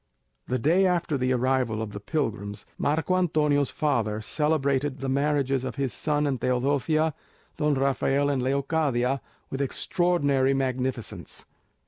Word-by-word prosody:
The 130 - 0
day 170 +10 +3
after 175 -4 0
the 130 -1 0
arrival 125 -3 +1
of 110 -2 -4
the 105 - -6
pilgrims, 105 -5 -3
Marco 160 +5 +1
Antonio's 150 -5 +2
father 115 -8 0
celebrated 140 +2 0
the 135 0 -4
marriages 140 -1 +1
of 130 - -4
his 135 -3 -1
son 150 -1 0
and 135 -3 -1
Teodosia, 145 +5 +1 0.4
Don 150 -1 +2
Rafael 135 +1 +1
and 135 -2 0
Leocadia, 135 -1 0 0.3
with 135 - -2
extraordinary 140 -2 +1
magnificence. 130 -2 -3
140 Hz, 130 wpm, -26 LUFS, 130-150 Hz, 0.4 s, day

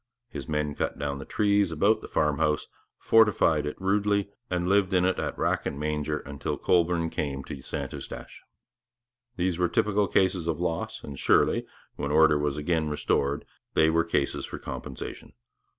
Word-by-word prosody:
His - - -7
men 75 -1 -1
cut - - -2
down 70 -1 -3
the 70 - -7
trees 100 -3 +2
about 100 +8 +2
the - - -8
farm 75 -1 +1
house, 75 -1 +1 0.3
fortified 100 -9 +4
it 75 - -5
rudely, 100 +1 +1 0.2
and 90 -1 -1
lived 95 0 +3
in 90 0 +4
it 95 - +1
at - - -3
rack - - 0
and 70 - -4
manger 75 0 -1
until 70 0 -4
Colborne 85 -1 +2
came 70 -2 -3
to 70 0 -8
St - - -5
Eustache. - - -8 0.9
These 90 -1 -1
were 90 -1 +2
typical 105 -1 +2
cases 95 -3 +1
of 85 - -1
loss, 85 -2 -3
and 70 -2 -8
surely, - - +3 0.3
when 70 - -2
order 75 0 +5
was 75 -1 -1
again 80 0 0
restored, 75 -1 0 0.3
they 80 0 +5
were 85 0 +3
cases 80 -4 -1
for - - -6
compensation. - - -7
80 Hz, 170 wpm, -27 LUFS, 75-95 Hz, 0.9 s, order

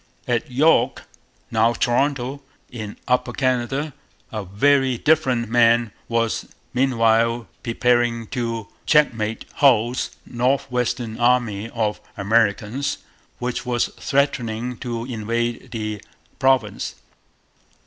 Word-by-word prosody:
At 120 0 0
York 150 +6 +3 0.5
(now 115 +1 +3
Toronto) 135 +2 0 0.3
in 110 -4 -7
Upper 125 0 +1
Canada 130 +3 0 0.4
a 110 -3 -4
very 130 +6 +2
different 130 -5 +2
man 115 0 +4 0.2
was 115 -1 0 0.3
meanwhile 115 -2 +2
preparing 120 -1 +1
to 115 -4 -2 0.2
checkmate 115 -8 +2
Hull's 125 -3 +3 0.2
'north 125 +3 0
western 125 -2 -2
army' 120 -3 +2
of 110 -3 -2 0.2
Americans, 110 +5 +1 0.4
which 125 0 -3
was 120 -2 0
threatening 125 -4 -1
to 120 -2 -4
invade 120 +1 -2
the 110 -3 -4 0.4
province. 130 -6 +1
120 Hz, 95 wpm, -22 LUFS, 115-130 Hz, 0.5 s, man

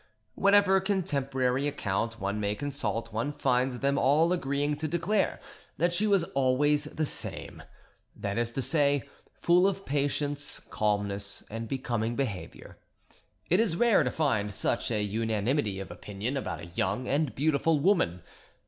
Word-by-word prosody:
Whatever 200 -1 +5
contemporary 140 -9 0
account 115 -4 -2
one 100 +1 -2
may 105 0 0
consult, 115 -5 -3
one 115 +7 -1
finds 125 -2 0
them 140 0 +2
all 160 +6 +4
agreeing 145 -2 0
to 155 +1 -2
declare 175 +6 0 0.4
that 175 +2 +2
she 205 +5 +1
was 200 -4 +4
always 145 +3 +2
the 155 +1 -2
same—that 100 -7 -7
is 120 0 0
to 135 - -1
say, 145 -4 +2 0.2
full 180 +2 +3
of 195 0 -2
patience, 145 +1 -1
calmness, 100 -1 -2
and 115 +1 -4
becoming 120 -3 -2
behaviour—and 100 -12 -5 0.7
it 180 - +5
is 215 -7 +2
rare 235 +3 +4
to - - +1
find 110 -10 0
such 110 +3 -1
a 105 -3 0
unanimity 110 +1 0
of 95 - -7
opinion 105 +6 -4
about 135 - -3
a - - -7
young 100 +8 -1
and 145 -1 0
beautiful 150 +2 +2
woman. 140 - +2
135 Hz, 145 wpm, -29 LUFS, 110-155 Hz, 0.7 s, Whatever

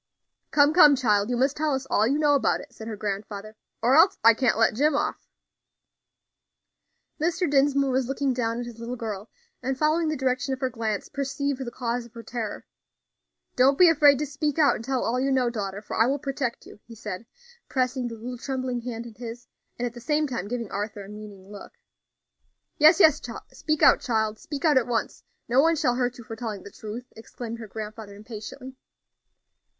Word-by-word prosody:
"Come, 290 +1 +4
come, 300 -4 +8
child, 210 -4 +2
you 245 - 0
must 265 +3 +2
tell 300 -2 0
us 265 0 -4
all 220 -4 +2
you 275 +4 +1
know 295 -1 +3
about 280 - +2
it," - - -12
said 220 - -9
her 220 - -4
grandfather, 205 +1 -5 0.3
"or 250 +3 +4
else 355 +5 +6
I 230 0 +8
can't 245 +1 +1
let 225 - +3
Jim 290 +6 +2
off." - - -2 1.9
Mr. 345 +2 +1
Dinsmore 275 -1 +3
was 260 -1 +1
looking 270 0 0
down 230 -1 -1
at 245 - -4
his 235 -1 -10
little 235 +2 -5
girl, 215 -3 -6 0.3
and, 260 +1 -2
following 315 +3 +2
the 310 -1 -1
direction 260 0 0
of - - -20
her 260 -1 -1
glance, 220 -3 -3
perceived 280 -1 -2
the 240 - -5
cause 240 -1 -3
of 235 - -27
her 230 - -8
terror. 225 -2 -5 0.9
"Don't 270 +2 +4
be 355 -2 +7
afraid 290 -3 +6
to 300 - -1
speak 290 +1 -2
out 300 -3 +4
and - - -7
tell 260 +1 -1
all 245 +2 0
you 270 +1 +1
know, 255 -3 +2
daughter, 200 -2 -4
for - - -6
I 225 - +4
will 275 +2 +1
protect 270 -3 -3
you," - - -14
he 230 - -11
said, 210 -1 -7 0.4
pressing 255 -1 0
the 230 - -6
little 240 +2 -7
trembling 255 -2 -3
hand 235 -1 -5
in 235 - -10
his, 235 +1 -8 0.3
and 245 - -2
at 240 - -4
the 240 - -10
same 300 +5 +1
time 240 -8 -4
giving 235 -2 -4
Arthur 205 0 -4
a - - -12
meaning 205 -2 -11
look. 205 - -10 1.1
"Yes, 310 +4 +7
yes, 310 -6 +6 0.3
speak 310 -1 -1
out, - - +7
child; 220 -3 -1
speak 290 +1 -5
out 295 -4 +5
at 245 - -4
once; 235 -2 -2 0.3
no 250 +3 +4
one 330 +2 +3
shall 255 -5 +1
hurt 245 0 -1
you 240 - -10
for 225 0 -8
telling 220 -4 -5
the 200 - -11
truth," 220 +3 -7
exclaimed 230 +1 -8
her 225 - -8
grandfather, 215 0 -8
impatiently. 225 +5 -9
245 Hz, 205 wpm, -26 LUFS, 225-275 Hz, 1.9 s, come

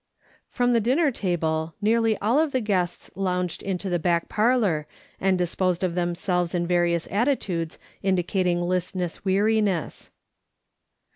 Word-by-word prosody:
From 245 0 +1
the 230 - +3
dinner 275 +7 +2
table 160 -6 -1
nearly 225 +1 +2
all 230 +8 +2
of 315 -2 +1
the 260 - +2
guests 190 -6 -2
lounged 180 -2 -2
into 195 0 -3
the 175 -2 0
back 170 +1 +1
parlour, 210 -9 +2 0.3
and 190 -1 +2
disposed 180 0 0
of 180 -2 0
them 175 0 -1
selves 180 -1 -1
in 175 -1 0
various 170 -1 +1
attitudes 195 - -1 0.2
indicating 180 -1 +1
listless 180 0 -2
weari 205 +3 +2
nees. 190 -6 -2
185 Hz, 140 wpm, -25 LUFS, 175-215 Hz, 0.3 s, the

